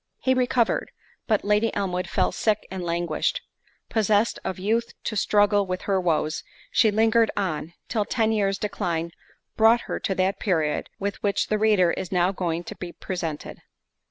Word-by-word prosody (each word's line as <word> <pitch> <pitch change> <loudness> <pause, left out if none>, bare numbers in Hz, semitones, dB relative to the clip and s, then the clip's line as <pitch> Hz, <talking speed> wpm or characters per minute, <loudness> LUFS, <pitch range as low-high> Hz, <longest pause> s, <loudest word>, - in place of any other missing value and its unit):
He 260 - +2
recovered, 250 -2 +1 0.4
but 215 -3 +1
Lady 210 +2 +2
Elmwood 180 -3 -2
fell - - +1
sick 215 -2 0
and 190 -1 -4
languished—possessed 185 +5 -1
of 190 - -3
youth 225 +5 -1
to 215 - -3
struggle 205 -1 +3
with 185 0 -3
her 195 -2 +1
woes, 155 -2 0 0.3
she 220 - +4
lingered 225 +2 +3
on, 170 -4 -2
till 215 -3 0
ten 225 -1 +1
years 200 -3 +1
decline 170 -5 -2 0.5
brought 225 +2 +5
her - - -4
to 190 - -1
that 190 +1 0
period, 160 -7 0
with 200 0 -4
which 200 -1 0
the 215 - +1
reader 205 -5 +4
is 185 - -4
now 180 0 +2
going 175 -3 -2
to - - -8
be 175 -1 -7
presented. 165 -5 -5
200 Hz, 160 wpm, -25 LUFS, 180-215 Hz, 0.5 s, brought